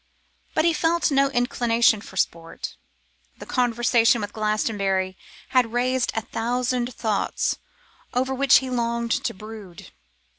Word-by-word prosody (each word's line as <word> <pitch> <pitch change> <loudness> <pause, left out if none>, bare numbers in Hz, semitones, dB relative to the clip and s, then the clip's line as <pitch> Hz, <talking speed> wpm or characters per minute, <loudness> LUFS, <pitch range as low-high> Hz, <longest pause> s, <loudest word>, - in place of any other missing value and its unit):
But 315 - +3
he 340 - +4
felt 330 0 +1
no 275 0 +3
inclination 240 -4 +2
for 190 - -12
sport. 165 -2 -3 0.6
The - - -9
conversation 240 -1 +2
with 205 0 -5
Glastonbury 200 -3 0 0.3
had 250 -3 +2
raised 250 +1 +1
a 225 - 0
thousand 245 +2 -2
thoughts 215 -3 -1 0.5
over 260 +2 0
which 270 0 +5
he 260 0 -2
longed 235 -1 -1
to - - 0
brood. 210 -4 -11
235 Hz, 125 wpm, -24 LUFS, 215-255 Hz, 0.6 s, which